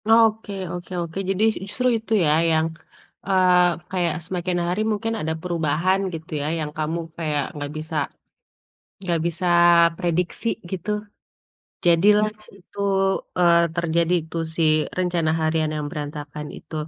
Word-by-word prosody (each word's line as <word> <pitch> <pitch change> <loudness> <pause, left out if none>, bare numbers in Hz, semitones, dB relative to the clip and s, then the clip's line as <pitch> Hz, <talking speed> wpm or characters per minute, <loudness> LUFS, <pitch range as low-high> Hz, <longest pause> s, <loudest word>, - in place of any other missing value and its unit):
Oke 225 -2 +4 0.2
oke 175 +1 -7
oke, 170 +1 -6
jadi 195 +2 +1 0.2
justru 250 +5 -1
itu 225 0 -4
ya, 150 - +3 0.2
yang, 160 0 +3 0.6
eee, 180 -2 +4
kayak 175 -3 0
semakin 180 0 -2
hari 180 +5 0
mungkin 225 +2 -1
ada 160 +1 -1
perubahan 170 +2 +1
gitu 160 0 -8
ya, 145 - -2
yang 150 -1 -3
kamu 155 +2 -1 0.2
kayak 150 -3 -1
enggak 145 -1 -5
bisa 160 +1 -6 1.1
enggak 175 -4 -1
bisa 170 +2 -2 0.5
prediksi 175 +6 -1 0.2
gitu. 190 +2 -4 0.9
Jadilah 205 +5 +5 0.3
itu, 180 - -19 0.6
eee, 170 -1 +5
terjadi 170 +1 +1 0.2
tuh, 165 - -2
si 165 - +1 0.4
rencana 175 -3 +1
harian 155 0 +1
yang 150 -1 -3
berantakan 150 0 -6
itu. - - -11
170 Hz, 130 wpm, -23 LUFS, 160-185 Hz, 1.1 s, Jadilah